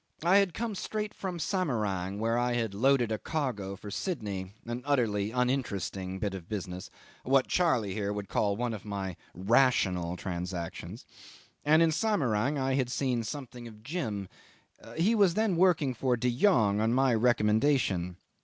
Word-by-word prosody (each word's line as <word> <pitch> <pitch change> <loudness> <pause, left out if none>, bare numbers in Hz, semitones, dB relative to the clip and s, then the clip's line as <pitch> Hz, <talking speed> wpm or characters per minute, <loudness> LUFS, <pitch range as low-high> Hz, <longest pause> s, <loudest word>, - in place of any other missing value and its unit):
I 180 +4 +5
had 195 -4 +2
come 230 -1 -2
straight 210 +2 -4
from 185 -3 -5
Samarang, 105 - -1
where 115 +2 0
I 120 0 +1
had 115 -4 -1
loaded 120 +1 +3
a 110 - -1
cargo 120 -11 -3
for 105 +1 -9
Sydney: 100 - -4
an 120 +1 -4
utterly 115 -8 +1
uninteresting 110 -7 -1
bit 100 0 -2
of 90 -3 -8
business, 95 -3 -5 0.3
what 135 0 +3
Charley 125 - +1
here 100 0 -2
would 105 -1 -4
call 100 -1 0
one 120 0 -1
of 105 - -7
my 100 -3 -4 0.2
rational 95 -4 +2
transactions, 90 -1 -5 0.6
and 155 +3 +5
in 165 - +3
Samarang 145 - +1
I 135 -1 0
had 130 -2 +1
seen 125 -2 0
something 120 0 -7
of 110 -1 -13
Jim. 110 - -3 0.7
He 185 +8 +3
was 200 -6 +4
then 215 -4 +2
working 165 -7 +3
for 125 +1 0
De 125 0 0
Jongh, 110 - +3
on 115 +2 +2
my 130 -1 +3
recommendation. 110 -5 +2
120 Hz, 160 wpm, -29 LUFS, 100-145 Hz, 0.7 s, I